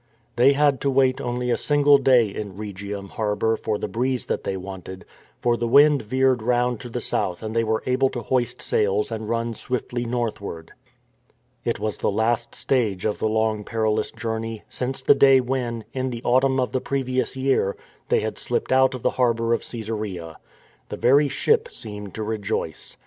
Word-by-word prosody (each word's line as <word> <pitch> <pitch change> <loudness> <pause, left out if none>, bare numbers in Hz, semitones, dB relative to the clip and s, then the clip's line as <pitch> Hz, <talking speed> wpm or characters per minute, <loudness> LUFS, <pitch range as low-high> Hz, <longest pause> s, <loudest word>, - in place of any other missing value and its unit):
They 130 +4 +5
had 145 -1 +2
to 140 - +1
wait 135 0 +2
only 125 0 -2
a - - +2
single 145 -1 +4
day 130 -3 +5
in 100 -1 -7
Rhegium 100 -1 -6
harbour 110 0 0
for 110 -2 -2
the - - -3
breeze 125 0 -1
that - - -2
they 95 - -2
wanted, 95 0 -8 0.4
for 120 -1 +3
the 120 0 -2
wind 145 +3 +6
veered 130 +2 +1
round 120 0 +1
to 120 - -8
the 120 - -3
south 100 -4 -2
and 110 +1 -5
they 115 - +3
were 110 0 -1
able 130 +1 +2
to 120 - -5
hoist 125 -3 -1
sails 105 +1 +1
and 110 -1 -4
run 115 0 -1
swiftly 120 +1 -3
northward. 110 -8 -4 0.9
It 115 -2 -1
was 105 0 -3
the - - +1
last 110 +3 0
stage 110 -8 0
of 105 - -1
the 110 - +1
long 110 -1 0
perilous 110 0 0
journey, 115 -1 -4
since 130 +1 -3
the - - +7
day 135 -1 +6
when, 125 -3 -2
in 130 0 -2
the 120 -1 -6
autumn 130 +2 +3
of 125 - 0
the 130 0 -1
previous 130 -1 -1
year, 130 -7 +1 0.3
they - - +3
had - - -4
slipped - - -2
out 130 0 +4
of 125 - -8
the - - +2
harbour 115 -1 +2
of - - 0
Caesarea. 105 -8 -5 0.5
The - - -5
very 140 +4 +4
ship 450 - +1
seemed 105 -2 -9
to 110 - -3
rejoice. 105 -6 -3
115 Hz, 185 wpm, -23 LUFS, 110-130 Hz, 0.9 s, the